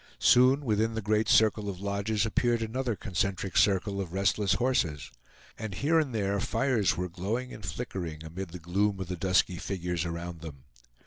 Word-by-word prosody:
Soon 130 +3 +5
within 110 0 +1
the 110 - -2
great 110 +1 +1
circle 105 -1 +4
of 95 -2 -6
lodges 100 +2 -1
appeared 120 +1 +1
another 120 +1 -2
concentric 95 -2 -2
circle 100 0 +2
of 90 -3 -6
restless 100 0 +2
horses; 80 - 0 0.5
and 110 -4 -5
here 160 +4 +2
and 150 -4 -1
there 100 -3 0
fires 125 -3 +1
were 90 +1 -1
glowing 105 +8 -3
and 105 - -10
flickering 90 -7 -5
amid 85 +4 -6
the 90 - -8
gloom 95 +4 0
of 95 -2 -5
the 90 - -2
dusky 90 0 +1
figures 90 -2 -3
around 85 -1 -5
them. 70 -5 -9
100 Hz, 175 wpm, -29 LUFS, 90-110 Hz, 0.5 s, Soon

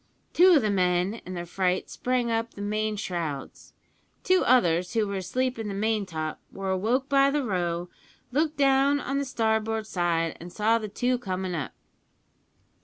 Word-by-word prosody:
Two 365 +1 +7
of 285 - +4
the 210 - +1
men 180 +2 +1
in 185 - -5
their 175 0 -4
fright 180 +1 -1
sprang 250 -2 -1
up 230 0 -2
the 205 - -7
main 215 +1 -1
shrouds. 170 -9 -5 0.5
Two 370 0 +3
others, 180 -6 +3
who 220 -2 +2
were 200 -1 -3
asleep 250 +6 -2
in 220 - -3
the 200 - -4
main 215 0 0
top, 155 -3 -4
were 195 -1 -3
awoke 230 +8 0
by 275 -1 +4
the 290 0 0
row, 175 -5 -1 0.4
looked 305 +3 0
down 275 +1 +4
on 275 0 -2
the 280 - -1
starboard 220 -3 0
side, 170 -4 0
an' 175 - -9
saw 220 +5 +2
the 215 - -5
two 245 +4 0
comin' 185 -4 -3
up. 155 -5 -4
215 Hz, 180 wpm, -26 LUFS, 180-250 Hz, 0.5 s, Two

